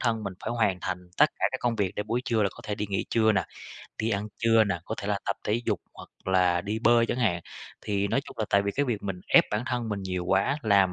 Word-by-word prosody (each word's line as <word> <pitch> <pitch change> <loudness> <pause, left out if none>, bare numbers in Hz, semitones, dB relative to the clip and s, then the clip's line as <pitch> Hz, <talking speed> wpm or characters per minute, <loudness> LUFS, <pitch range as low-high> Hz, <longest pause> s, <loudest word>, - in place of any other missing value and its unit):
thân 115 -3 0
mình 100 - -3
phải - - -2
hoàn 110 -6 +1
thành 90 -1 -2 0.2
tất 150 +1 +6
cả - - -1
các 130 - -3
công 120 -2 0
việc 100 -3 -1
để - - -2
buổi 115 +4 -1
trưa 110 -2 +1
là 100 - +3
có - - -18
thể 105 - -2
đi 105 +1 -3
nghỉ 100 - -1
trưa 110 -1 +4
nè, 95 -4 +1 0.6
đi 110 - 0
ăn 105 -1 -1
trưa 115 -1 +4
nè, 100 -5 -1
có - - -3
thể 100 - -4
là 105 -1 0
tập 100 - 0
thể 110 +3 0
dục, 105 -6 0
hoặc - - -12 0.2
là 90 -2 +3
đi 105 +3 -3
bơi 120 0 +5
chẳng 120 - -2
hạn, 95 -9 +1 0.4
thì 100 -1 0
nói 135 - +1
chung - - -12
là 110 - +1
tại 100 - +4
vì 100 0 -1
cái 145 +7 0
việc 115 -6 -2
mình 95 -3 -4
ép - - +7
bản 105 +2 0
thân 120 -2 -2
mình 100 -2 -2
nhiều 90 -2 -3
quá, 95 +11 +2
làm 100 -4 +4
105 Hz, 285 wpm, -27 LUFS, 100-115 Hz, 0.6 s, ép